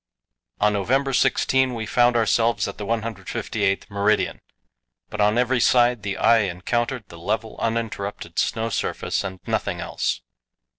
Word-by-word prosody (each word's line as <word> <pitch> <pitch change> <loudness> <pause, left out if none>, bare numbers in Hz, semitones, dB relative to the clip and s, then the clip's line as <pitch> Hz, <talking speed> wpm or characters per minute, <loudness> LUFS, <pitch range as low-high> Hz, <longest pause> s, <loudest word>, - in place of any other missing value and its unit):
On 105 0 +3
November 135 +7 +1
16 130 0 +2
we 110 -1 -4
found 120 +2 +3
ourselves 115 -1 +2
at 100 - -7
the 105 - -5
158th 110 -3 -2
meridian, 100 +1 0 0.7
but 105 - -2
on 105 +2 +3
every 125 +1 +2
side 120 -1 +4
the 100 -1 -3
eye 115 - +5
encountered 115 +6 -1
the 85 - -11
level, 110 +5 -2
uninterrupted 110 -3 -3
snow 115 +1 0
surface - - -2
and 95 -2 -6
nothing - - -1
else. - - -2
110 Hz, 140 wpm, -23 LUFS, 100-120 Hz, 0.7 s, eye